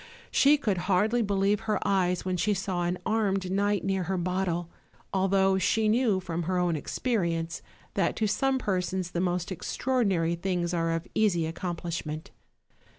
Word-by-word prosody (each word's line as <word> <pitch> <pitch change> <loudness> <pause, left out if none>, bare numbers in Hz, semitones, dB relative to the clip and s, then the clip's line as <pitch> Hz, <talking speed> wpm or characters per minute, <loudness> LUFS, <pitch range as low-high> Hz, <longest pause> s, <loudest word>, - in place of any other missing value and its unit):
She 290 +2 +5
could 210 -10 0
hardly 215 +6 +3
believe 200 -1 +1
her 220 -1 -1
eyes 180 -2 +1
when 185 -1 0
she 205 +3 +1
saw 190 -2 -2
an 175 +1 -1
armed 195 -4 0
knight 200 +1 +1
near 190 -2 0
her 190 +2 -1
bottle, 175 -1 -1 0.5
although 190 0 +3
she 215 +3 +2
knew, 220 -3 +3
from 175 -2 -3
her 180 +2 -1
own 175 -2 +1
experience, 165 - -1 0.3
that - - +1
to 220 - 0
some 265 +6 +1
persons 185 -5 -1
the 175 - -1
most 180 0 -1
extraordinary 190 -4 0
things 175 0 -1
are 165 -1 0
of 165 +1 -2
easy 185 -7 +2
accomplish 170 0 -4
ment. 155 +1 -6
185 Hz, 160 wpm, -28 LUFS, 175-205 Hz, 0.5 s, She